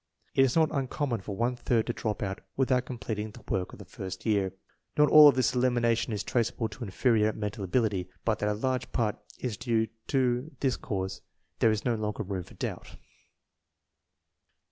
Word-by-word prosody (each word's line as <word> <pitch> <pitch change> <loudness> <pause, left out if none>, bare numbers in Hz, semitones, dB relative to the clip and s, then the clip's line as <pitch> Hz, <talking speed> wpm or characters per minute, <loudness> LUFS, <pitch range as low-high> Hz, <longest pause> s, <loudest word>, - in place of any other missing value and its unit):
It 135 - +5
is 130 -2 +2
not 160 -2 +4
uncommon 135 -3 -1
for 100 +1 -5
one 120 +4 0
third 120 -2 +1
to 120 - -2
drop 110 -2 -2
out 95 -1 -3 0.2
without 130 -1 +2
completing 110 -3 -4
the - - -14
work 90 -1 -1
of - - -11
the - - -10
first 95 -1 -7
year. 100 -4 +2 0.5
Not 150 0 +6
all 150 -1 +11
of 145 - +6
this 130 - +2
elimination 120 -2 +2
is 105 -1 -2
traceable 115 -1 0
to 120 - -8
inferior 110 +1 +2
mental 105 -1 -4
ability, 95 -2 0 0.2
but 110 -2 +1
that 105 - +1
a 105 - 0
large 130 +2 -1
part 110 -4 0 0.2
is 120 -5 -3
due 110 -1 0 0.2
to 130 0 +1
this 130 -3 +1
cause 95 -2 -4 0.4
there 115 - +5
is 110 -1 -1
no 120 - +2
longer 110 -1 -2
room 95 -2 -3
for - - -16
doubt. - - -5
115 Hz, 190 wpm, -29 LUFS, 105-125 Hz, 0.5 s, all